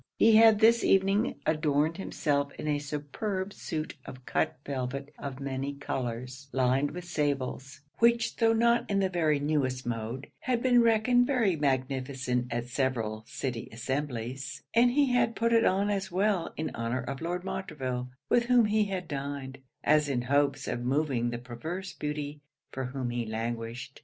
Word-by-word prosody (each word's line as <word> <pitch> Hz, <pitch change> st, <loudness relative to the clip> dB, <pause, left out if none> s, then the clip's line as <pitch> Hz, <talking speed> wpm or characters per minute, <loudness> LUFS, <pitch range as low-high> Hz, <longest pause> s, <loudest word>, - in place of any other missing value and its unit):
He 225 Hz, 0 st, +6 dB
had 220 Hz, -1 st, +8 dB
this 230 Hz, +2 st, +5 dB
evening 195 Hz, +2 st, +3 dB
adorned 155 Hz, +1 st, +1 dB
himself 145 Hz, -7 st, -1 dB
in -, -, -6 dB
a 145 Hz, -1 st, +1 dB
superb 170 Hz, +8 st, -4 dB
suit 155 Hz, -1 st, -4 dB
of 130 Hz, 0 st, -11 dB
cut -, -, 0 dB
velvet 135 Hz, +1 st, -4 dB
of 140 Hz, -1 st, -6 dB
many 135 Hz, +1 st, -3 dB
colours, 130 Hz, 0 st, -5 dB
lined 130 Hz, +2 st, +2 dB
with 180 Hz, +2 st, -7 dB
sables; 140 Hz, -4 st, -2 dB, 0.2 s
which 235 Hz, 0 st, +3 dB
tho' 225 Hz, -1 st, +4 dB
not 235 Hz, +1 st, +3 dB
in 200 Hz, -, +1 dB
the 195 Hz, -1 st, +2 dB
very 155 Hz, -4 st, +2 dB
newest 140 Hz, -4 st, 0 dB
mode, 120 Hz, +3 st, -3 dB
had 245 Hz, -2 st, -1 dB
been 245 Hz, -2 st, +5 dB
reckoned 235 Hz, +2 st, +4 dB
very 230 Hz, -10 st, +2 dB
magnificent 130 Hz, -3 st, -1 dB
at 120 Hz, 0 st, -2 dB
several 120 Hz, -4 st, -2 dB
city 125 Hz, -4 st, -4 dB
assemblies; 130 Hz, +2 st, -4 dB
and 240 Hz, +2 st, +5 dB
he 275 Hz, +1 st, +3 dB
had 240 Hz, -2 st, +2 dB
put 230 Hz, +1 st, +1 dB
it 230 Hz, 0 st, +5 dB
on 200 Hz, +2 st, +2 dB
as 195 Hz, -2 st, -2 dB
well 190 Hz, -1 st, +1 dB
in 160 Hz, -, -2 dB
honour 115 Hz, +2 st, -2 dB
of 135 Hz, +2 st, -5 dB
Lord 175 Hz, +2 st, -2 dB
Montreville, 130 Hz, -10 st, -4 dB, 0.2 s
with 240 Hz, 0 st, +3 dB
whom 245 Hz, -2 st, +5 dB
he 210 Hz, 0 st, +2 dB
had 185 Hz, -3 st, -4 dB
dined, 140 Hz, -2 st, -5 dB, 0.2 s
as 150 Hz, -1 st, +4 dB
in 125 Hz, -3 st, 0 dB
hopes 140 Hz, +1 st, +1 dB
of 120 Hz, -, -2 dB
moving 130 Hz, -2 st, +1 dB
the 120 Hz, -, -3 dB
perverse 155 Hz, +11 st, -6 dB
beauty 150 Hz, 0 st, -4 dB, 0.3 s
for 130 Hz, 0 st, -3 dB
whom 125 Hz, -1 st, -3 dB
he 120 Hz, 0 st, -1 dB
languished. 115 Hz, +3 st, -4 dB
145 Hz, 165 wpm, -29 LUFS, 130-195 Hz, 0.3 s, had